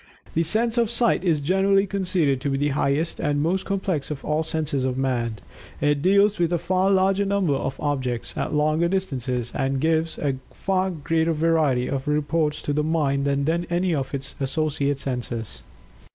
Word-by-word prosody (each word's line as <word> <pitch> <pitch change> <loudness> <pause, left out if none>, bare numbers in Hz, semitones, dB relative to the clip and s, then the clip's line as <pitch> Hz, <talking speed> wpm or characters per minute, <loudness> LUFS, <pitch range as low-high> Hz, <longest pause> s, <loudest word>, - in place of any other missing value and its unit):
The 165 - +2
sense 225 +8 +1
of 230 -2 +2
Sight 235 -2 +2
is 165 -5 +2
generally 195 +5 +3
conceded 180 -9 0
to 145 - -1
be 135 - 0
the 145 +1 +1
highest 140 +3 0
and 145 0 0
most 180 +6 0
complex 190 -7 -2
of 150 -2 -6
all 150 +1 +1
the 160 - -5
senses 150 -4 -1
of 130 -1 -1
Man. 120 -4 -1 0.4
It 145 -1 +1
deals 200 +3 +3
with 170 -1 +1
a 175 - +2
far 185 +3 +1
larger 195 +1 +3
number 195 -6 +1
of 135 0 -3
objects 130 -5 -2
at - - -2
longer 155 +3 +2
distances 130 -10 -2
and 135 0 -1
gives 160 +2 +1
a 140 -3 -1
far 190 -1 -1
greater 165 0 0
variety 155 -6 +2
of 135 0 -3
reports 150 +1 0
to 145 - -1
the 150 - +1
mind 145 -3 0
than 140 +5 0
any 175 +1 +1
of 140 -2 -2
its 135 0 -6
associate 140 0 -1
senses. 125 -5 -4
155 Hz, 180 wpm, -24 LUFS, 140-180 Hz, 0.4 s, generally